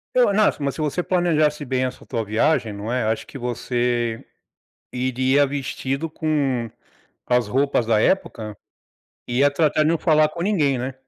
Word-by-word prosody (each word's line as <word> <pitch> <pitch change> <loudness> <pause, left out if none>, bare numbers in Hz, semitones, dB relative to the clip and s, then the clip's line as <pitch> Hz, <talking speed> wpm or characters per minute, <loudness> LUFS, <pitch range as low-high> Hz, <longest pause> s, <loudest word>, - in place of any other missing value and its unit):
É 255 - +5
o 200 - +2
nas 210 0 +3
mas 140 -2 -2
se 155 - -5
você 155 +4 -1
planejasse 155 -5 +1
bem 130 -1 -1
essa 130 0 -6
tua 115 -3 -3
viagem, 110 +1 +1
não 105 +3 -5
é. 125 0 0
Acho 110 +1 -2
que 140 - -9
você 120 -1 -2 0.7
iria 130 +2 +2
vestido 140 +2 -3
com 140 -7 -1 0.6
as 125 -3 +1
roupas 135 0 +1
da 110 -2 +3
época, 115 - 0 0.7
e 120 +1 -1
ia 145 +1 +5
tratar 150 +1 +1
de 155 - +3
não 165 - +2
falar 155 -2 +3
com 170 - -7
ninguém, 155 -10 +1
né? 130 +2 -4
135 Hz, 175 wpm, -22 LUFS, 120-155 Hz, 0.7 s, É